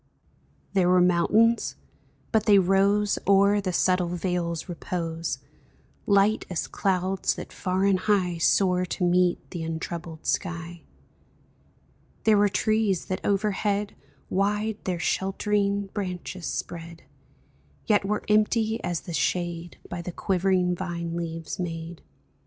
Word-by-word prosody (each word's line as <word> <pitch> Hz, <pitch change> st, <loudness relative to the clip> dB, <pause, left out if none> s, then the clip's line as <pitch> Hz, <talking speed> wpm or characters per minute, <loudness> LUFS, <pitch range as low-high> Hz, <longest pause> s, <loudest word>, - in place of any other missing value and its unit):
There 185 Hz, -3 st, +3 dB
were 180 Hz, 0 st, +5 dB
mountains, 195 Hz, +6 st, +3 dB, 0.6 s
but 220 Hz, -1 st, +1 dB
they 205 Hz, -1 st, +7 dB
rose 195 Hz, +2 st, +3 dB
O'er 200 Hz, +1 st, +5 dB
the 185 Hz, -2 st, -2 dB
subtile 180 Hz, 0 st, +2 dB
vale's 175 Hz, -1 st, -2 dB
repose, 165 Hz, -1 st, -3 dB, 0.7 s
Light 200 Hz, +1 st, +3 dB
as 180 Hz, -, -2 dB
clouds 190 Hz, 0 st, 0 dB
that -, -, -8 dB
far 185 Hz, +1 st, 0 dB
and 195 Hz, -2 st, +3 dB
high 185 Hz, -4 st, +1 dB
Soar 180 Hz, +1 st, +3 dB
to 180 Hz, +1 st, -3 dB
meet 180 Hz, 0 st, +2 dB
the 175 Hz, -, -5 dB
untroubled 165 Hz, 0 st, -5 dB
sky. 170 Hz, -2 st, -2 dB, 1.4 s
There 215 Hz, -2 st, +5 dB
were 205 Hz, 0 st, +4 dB
trees 215 Hz, -3 st, +1 dB
that 185 Hz, -, -3 dB
overhead 205 Hz, 0 st, 0 dB, 0.3 s
Wide 210 Hz, +2 st, 0 dB
their 180 Hz, -2 st, -1 dB
sheltering 200 Hz, +2 st, 0 dB
branches 180 Hz, -3 st, -4 dB
spread, 170 Hz, 0 st, -6 dB, 0.8 s
Yet 210 Hz, -2 st, +3 dB
were 210 Hz, +2 st, -1 dB
empty 220 Hz, +1 st, +2 dB
as 175 Hz, -2 st, -2 dB
the 170 Hz, -, -8 dB
shade 170 Hz, +3 st, -2 dB
By 175 Hz, -, -5 dB
the 180 Hz, -, -5 dB
quivering 185 Hz, -1 st, +1 dB
vine 170 Hz, -2 st, -4 dB
leaves 165 Hz, -1 st, -5 dB
made. 165 Hz, -1 st, -5 dB
185 Hz, 125 wpm, -26 LUFS, 175-200 Hz, 1.4 s, they